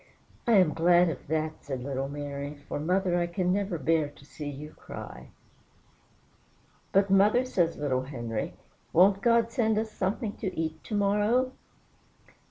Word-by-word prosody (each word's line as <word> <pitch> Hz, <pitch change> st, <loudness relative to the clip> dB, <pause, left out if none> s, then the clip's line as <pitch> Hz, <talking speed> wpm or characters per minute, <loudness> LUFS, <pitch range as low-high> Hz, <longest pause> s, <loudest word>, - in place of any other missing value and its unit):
'" -, -, -29 dB
"I 235 Hz, -, +4 dB
am 185 Hz, -7 st, +5 dB
glad 175 Hz, +1 st, +4 dB
of 150 Hz, -, -6 dB
that," 155 Hz, +1 st, -2 dB
said 135 Hz, -3 st, -5 dB
little 135 Hz, 0 st, -3 dB
Mary, 145 Hz, 0 st, -5 dB
"for, -, -, -3 dB
mother, 180 Hz, +3 st, +1 dB
I 175 Hz, -, 0 dB, 0.2 s
never 190 Hz, 0 st, 0 dB
can 140 Hz, -, -11 dB
bear 160 Hz, -2 st, +2 dB
to 140 Hz, -, -18 dB
see 145 Hz, 0 st, -7 dB
you 145 Hz, +2 st, -8 dB
cry." -, -, -10 dB, 1.6 s
"But, 195 Hz, 0 st, +3 dB
mother," 210 Hz, +6 st, +5 dB
says 175 Hz, -9 st, 0 dB
little 135 Hz, -3 st, 0 dB
Henry, 120 Hz, -5 st, -4 dB, 0.4 s
"won't 195 Hz, +3 st, +5 dB
God 230 Hz, 0 st, +3 dB
send 220 Hz, -3 st, +1 dB
us 220 Hz, 0 st, -1 dB
something 205 Hz, +3 st, -2 dB
to 195 Hz, -4 st, -4 dB
eat 160 Hz, -1 st, -3 dB
to 215 Hz, -, -3 dB
morrow?" 210 Hz, +5 st, +2 dB
175 Hz, 160 wpm, -28 LUFS, 145-205 Hz, 1.6 s, am